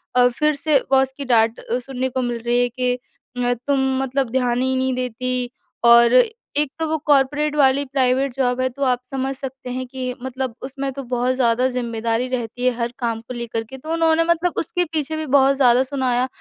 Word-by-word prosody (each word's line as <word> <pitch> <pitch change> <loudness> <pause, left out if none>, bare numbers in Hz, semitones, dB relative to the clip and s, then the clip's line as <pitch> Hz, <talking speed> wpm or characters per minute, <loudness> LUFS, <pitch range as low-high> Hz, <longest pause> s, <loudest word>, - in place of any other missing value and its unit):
अ, 250 0 +6
फिर 300 +5 +1
से 295 -1 +2
बॉस 265 0 +4
की 280 - -5
डाँट 230 -2 +2
अ, 240 +2 -3
सुनने 260 0 -3
को 260 +1 -2
मिल 240 -1 -2
रही 240 +1 +2
है 245 - +1
कि 250 +1 -1
अ, 245 0 -4
"तुम 280 -1 +2 0.2
मतलब 265 -1 -1
ध्यान 250 -1 +1
ही 260 0 +1
नहीं 260 0 0
देती।" 250 0 -3 0.3
और 235 0 +7 0.4
एक 295 -1 +2
तो 320 - 0
वो 315 - +1
कॉर्पोरेट 290 +1 +2
वाली 275 -1 +4
प्राइवेट 265 0 +1
जॉब 250 -2 0
है, 260 - +2
तो 275 +3 -5
आप 250 -2 +2
समझ 270 +1 -3
सकते 265 -1 -7
हैं 255 +1 -3
कि 255 0 -4
मतलब 260 -1 -4
उसमें 275 +1 -4
तो 275 +1 -6
बहुत 250 0 0
ज़्यादा 250 0 +2
ज़िम्मेदारी 235 -1 -2
रहती 245 -1 -3
है, 255 - +4
हर 235 0 -2
काम 230 -3 -1
को 235 +2 -9
लेकर 235 -2 -4
के, 265 +4 -11
तो 310 +5 -7
उन्होंने 330 0 +3
मतलब 340 +1 +1
उसके 355 +3 0
पीछे 310 0 -1
भी 315 - -3
बहुत 275 -1 +4
ज़्यादा 255 -2 +4
सुनाया 260 -2 0
255 Hz, 210 wpm, -21 LUFS, 245-275 Hz, 0.4 s, और